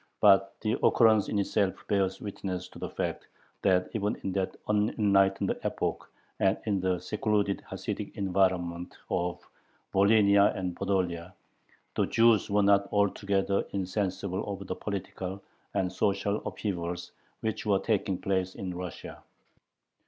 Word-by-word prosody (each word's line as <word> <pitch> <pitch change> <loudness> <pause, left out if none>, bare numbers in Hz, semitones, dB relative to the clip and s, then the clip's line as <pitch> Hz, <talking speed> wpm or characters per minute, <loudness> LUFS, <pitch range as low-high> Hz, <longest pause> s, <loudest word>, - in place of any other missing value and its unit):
But 95 -1 +5
the 110 +2 -1
occurrence 110 -3 +5
in 105 - -1
itself 100 -1 +1
bears 95 -2 +1
witness 95 -3 -5
to - - -12
the - - -4
fact - - -3 0.3
that 90 -1 +3
even 105 -1 0
in 95 - -1
that 95 0 -2
unenlightened 105 -2 +2
epoch - - -2 0.3
and 95 +1 +3
in 100 -3 +1
the 95 0 +1
secluded 105 0 0
Hasidic - - -5
environment 90 -3 0
of 90 0 -2 0.5
Volhynia 100 0 +5
and 90 -2 -3
Podolia, 90 -3 -1 0.6
the - - +1
Jews 115 -3 +4
were 100 0 +3
not 100 0 +3
altogether 100 -1 +1
insensible 95 -1 -2
of 100 0 -6
the - - -3
political 95 -1 -5 0.4
and 90 -1 +1
social 100 +2 +1
upheavals 90 -3 -4 0.3
which 110 -1 -3
were 100 -2 +4
taking 100 -2 0
place 95 -1 -1
in 95 -2 -4
Russia. 90 -1 -7
100 Hz, 130 wpm, -29 LUFS, 95-100 Hz, 0.6 s, But